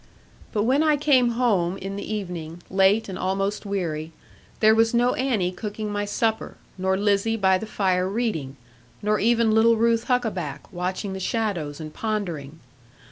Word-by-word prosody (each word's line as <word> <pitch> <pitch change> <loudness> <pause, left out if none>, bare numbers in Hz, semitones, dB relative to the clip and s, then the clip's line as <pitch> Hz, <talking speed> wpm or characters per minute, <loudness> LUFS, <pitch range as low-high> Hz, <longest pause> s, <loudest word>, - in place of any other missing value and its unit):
But 210 - 0
when 260 +6 +3
I 305 -2 +3
came 260 -5 +3
home 195 -7 +1
in 195 0 -6
the 200 - -6
evening, 175 -5 -5
late 195 +3 +3
and 190 - -6
almost 195 +2 -1
weary, 165 -5 -3 0.5
there 220 0 +6
was 225 +1 +3
no 245 +1 +3
Annie 230 -9 0
cooking 210 +2 -5
my 205 0 -1
supper, 220 +2 -1 0.2
nor 190 0 0
Lizzie 205 +2 +1
by 190 -2 +3
the 220 - -6
fire 185 -3 0
reading, 195 - -2 0.5
nor 210 0 +2
even 230 0 +3
little 225 +1 +5
Ruth 230 0 +2
Huckaback 195 - -2
watching 185 +2 -3
the 190 - -5
shadows 185 -9 -2
and 155 -1 -7
pondering. 170 -9 -4
205 Hz, 160 wpm, -24 LUFS, 185-225 Hz, 0.5 s, there